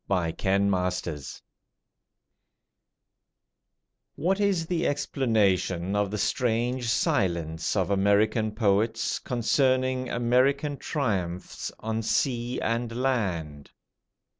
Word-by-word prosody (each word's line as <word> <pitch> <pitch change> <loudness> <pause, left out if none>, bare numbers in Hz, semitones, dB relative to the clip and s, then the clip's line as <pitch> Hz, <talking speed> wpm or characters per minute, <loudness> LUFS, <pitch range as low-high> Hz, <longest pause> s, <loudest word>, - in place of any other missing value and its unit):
THE 90 -4 0
POET'S 95 -2 +1
THEME 75 -5 -7 2.7
What 190 +6 0
is 195 -5 +1
the 170 0 0
explanation 100 -9 0
of 105 -1 +1
the 105 - -3
strange 120 +3 0
silence 85 -7 0
of 95 -1 0
American 105 +2 +2
poets 110 +1 +1
concerning 130 +1 +1
American 130 +5 +1
triumphs 95 - -3
on 110 0 -2
sea 120 +2 0
and 115 +1 -1
land? 90 - -2
110 Hz, 90 wpm, -27 LUFS, 95-130 Hz, 2.7 s, American